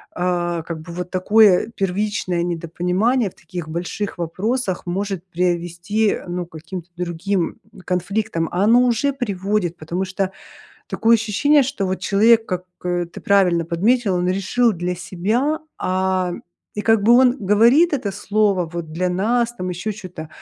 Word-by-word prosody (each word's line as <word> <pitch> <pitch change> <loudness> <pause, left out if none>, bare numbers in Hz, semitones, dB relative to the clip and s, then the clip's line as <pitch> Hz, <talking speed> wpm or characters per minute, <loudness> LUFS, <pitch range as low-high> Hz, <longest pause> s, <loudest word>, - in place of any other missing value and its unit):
э, 175 -2 -1
как 165 -2 -6
бы 170 +1 -9
вот 180 0 -5
такое 205 +1 +4
первичное 190 -2 -1
недопонимание 180 +7 0
в - - -28
таких 175 -4 -7
больших 175 +5 -4
вопросах 190 +5 -2
может 190 0 -3
привести, 175 +4 0
ну 175 0 -3
к 170 - -27
каким-то 170 +2 -8
другим 180 +1 -2 0.3
конфликтам, 180 -1 -1
а 180 +3 0
оно 235 +4 +5
уже 250 +4 +1
приводит, 200 -7 -2
потому 175 +4 -3
что 190 0 -2 0.6
такое 230 +1 +3
ощущение, 270 +7 +3
что 260 -6 -2
вот 185 0 -2
человек 225 +4 +4
как, 180 -1 -3 0.2
э, 175 -1 -1
ты 170 - -11
правильно 180 -4 +3
подметила, 195 +5 +1
он 180 - 0
решил 200 +6 +2
для 180 -1 -3
себя, 215 - -1 0.2
а. 185 -1 0 0.4
И 210 - -3
как 225 -2 +3
бы 230 +4 +5
он 250 +1 +5
говорит 235 - +4
это 215 -8 -2
слово, 200 -2 +1
вот, 170 -2 -5
для 180 +3 0
нас, 230 +6 0
там 180 -5 -4
еще 180 +5 -3
чё-то. 180 -6 -9
190 Hz, 155 wpm, -21 LUFS, 175-215 Hz, 0.6 s, оно